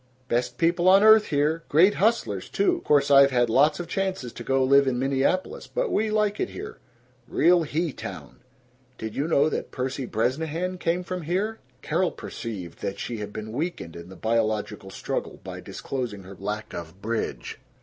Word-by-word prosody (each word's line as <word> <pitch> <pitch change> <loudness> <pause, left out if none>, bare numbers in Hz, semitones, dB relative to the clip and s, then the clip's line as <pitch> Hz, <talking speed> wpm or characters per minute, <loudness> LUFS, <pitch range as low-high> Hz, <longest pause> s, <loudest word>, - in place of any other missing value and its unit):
"Best 120 0 -1
people 175 +2 +3
on 195 +2 +7
earth 220 0 +7
here. 150 +2 +1
Great 180 +7 +5
hustlers, 225 +4 0
too. 365 -3 +1
Course 145 -1 +3
I've 140 0 +8
had 120 -3 +2
lots 145 +6 +4
of 175 - -4
chances 190 - -2
to - - -8
go 135 0 +2
live 140 +1 +5
in 125 -2 +1
Minneapolis, 135 +8 0
but - - -2
we 220 +1 +1
like 210 -1 +1
it 375 - -1
here. 420 +3 -8 0.5
Real 175 +6 +4
he 160 0 -1
town. - - -8 0.6
Did 110 -1 -6
you 145 - -1
know 150 -3 +4
that - - -3
Percy 130 0 -3
Bresnahan 160 - -1
came 175 +2 0
from 180 0 -4
here?" 195 +7 -1 0.2
Carol 175 +4 +1
perceived 100 - -7
that 100 - -3
she 120 - -4
had 105 -1 -6
been 110 +1 -6
weakened 135 - -4
in 85 +1 -9
the 95 - -11
biological 110 -2 -1
struggle - - -4
by - - -7
disclosing 120 -7 -5
her 95 +1 -11
lack 105 +3 -5
of 85 +2 -8
bridge. 110 +2 -3
145 Hz, 180 wpm, -25 LUFS, 115-180 Hz, 0.6 s, I've